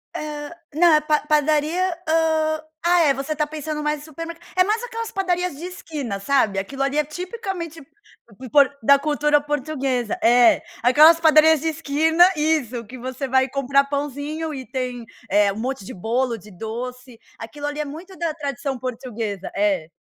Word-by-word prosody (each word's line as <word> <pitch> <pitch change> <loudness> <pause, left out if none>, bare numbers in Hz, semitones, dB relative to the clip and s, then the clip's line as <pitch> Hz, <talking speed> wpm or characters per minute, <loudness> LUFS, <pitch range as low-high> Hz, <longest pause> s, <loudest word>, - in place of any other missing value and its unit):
Hã 295 0 -5 0.2
na 315 0 +5
pa 300 0 +2
padaria, 310 +4 +1
hum 315 -1 +1 0.2
ah 350 0 +5
é, 295 -4 +4
você 275 +3 -3
está 300 0 0
pensando 300 0 -5
mais 300 0 -1
em - - -12
supermer 330 +2 -7 0.2
é 365 - +5
mais 425 +4 0
aquelas 460 -2 -5
padarias 360 -5 -1
de 330 - -7
esquina, 300 - -5
sabe? 220 -4 +1
Aquilo 270 +8 -3
ali 275 +2 -1
é 300 - +3
tipicamente 350 0 -6
p 265 - -16
por 280 +1 +5
da 280 +5 +6
cultura 295 0 +2
portuguesa. 275 -5 -2
É. 240 0 +5 0.2
Aquelas 305 +7 +7
padarias 315 -1 +6
de 320 - -3
esquina 320 +1 +2
isso, 285 -7 0
que 250 +5 -10
você 260 +2 -5
vai 260 0 +2
comprar 275 +1 +2
pãozinho 290 +3 -4
e 265 -2 -6
tem, 250 -2 -4 0.3
eh, 205 +1 +3
um 195 - -7
monte 260 -1 -3
de - - -8
bolo, 235 +5 -1
de 210 0 -15
doce. 240 +5 -7 0.2
Aquilo 290 +6 -8
ali 290 +1 -4
é - - -3
muito 335 +7 -9
da 335 -2 -2
tradição 280 -3 -4
portuguesa 230 -6 -5
é. 195 -5 +1
290 Hz, 170 wpm, -22 LUFS, 255-315 Hz, 0.3 s, Aquelas